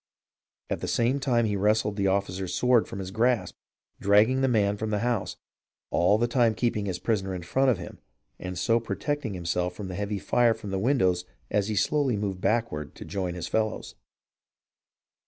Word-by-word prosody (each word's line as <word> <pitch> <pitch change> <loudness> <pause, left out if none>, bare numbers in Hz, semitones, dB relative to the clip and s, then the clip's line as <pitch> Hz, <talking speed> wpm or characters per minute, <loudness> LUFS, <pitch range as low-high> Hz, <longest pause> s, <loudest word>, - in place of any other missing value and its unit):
" - - -56
At - - -1
the - - -3
same 125 +4 +1
time 120 -4 +2
he 105 -2 0
wrested 105 +1 +1
the 100 -1 +1
officer's 95 -1 -1
sword 125 -2 +3
from - - -7
his 95 -1 -5
grasp 120 +3 +1 0.4
and - - -15
dragged 105 +6 +4
the 135 - +3
man 105 -5 +2
from 110 +1 -3
the 105 -1 0
house, 120 -5 -1 0.5
all 90 +5 +3
the 120 +2 +1
time 120 -2 +2
keeping 110 -4 -1
his 90 -2 -2
prisoner 95 -2 -1
in 90 - -6
front 135 +10 +2
of 120 - +2
him 85 - -9 0.4
and 90 0 -5
so 115 +7 +2
protecting 130 -1 -3
himself 90 +1 -2
from 100 -3 -6
the 90 - -5
heavy 105 +1 -2
fire 115 +3 +2
from 105 -3 -8
the 95 - -1
windows 95 -7 +2 0.3
as 105 -1 +1
he 110 - -2
slowly 135 +1 +1
moved 100 -3 -3
back 115 +3 +1
ward 75 -1 -6
to - - -9
join 90 -3 -3
his 85 -1 -4
fellows. 110 -1 -2
105 Hz, 200 wpm, -27 LUFS, 95-120 Hz, 0.5 s, dragged